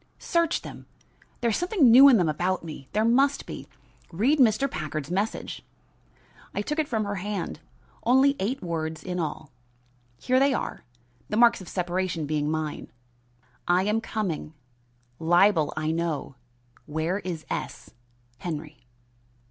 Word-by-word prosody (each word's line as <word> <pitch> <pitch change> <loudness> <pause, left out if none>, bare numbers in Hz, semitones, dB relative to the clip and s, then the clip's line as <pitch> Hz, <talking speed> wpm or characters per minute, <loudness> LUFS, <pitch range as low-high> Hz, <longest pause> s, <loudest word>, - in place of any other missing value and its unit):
"Search 335 -1 0
them! - - -10 0.5
There 235 -1 +2
is - - +1
something 355 - +4
new 270 +4 +10
in 250 - +6
them 175 -4 +2
about 175 +4 -1
me. 150 -5 -9
There 215 +1 +1
must 270 +5 +3
be. - - -8 0.4
Read 245 - +2
Mr. 240 +1 +4
Packard's 155 - -5
message." 200 +4 -2 0.9
I 205 - -1
took 300 +7 -2
it 310 - +1
from 220 -5 -1
her 205 0 -3
hand; 200 -6 -4 0.4
only 265 +4 +4
eight 235 +6 -2
words 160 -2 -3
in 180 -1 -3
all. 155 -2 -4 0.7
Here 255 0 +2
they 275 -1 +3
are - - -4 0.5
the 210 - -1
marks 235 -3 +5
of 185 - -10
separation 180 -2 -2
being 150 0 -1
mine: 155 -1 -3 0.8
I 180 +1 +3
am 210 +3 +1
coming 180 -9 -4 0.6
libel 175 -1 +4
I 155 0 0
know 165 -4 -2 0.5
where 160 +5 -1
is 175 -5 -5
S. - - -5 0.5
Henry. 155 -2 -6
185 Hz, 145 wpm, -26 LUFS, 160-235 Hz, 0.9 s, new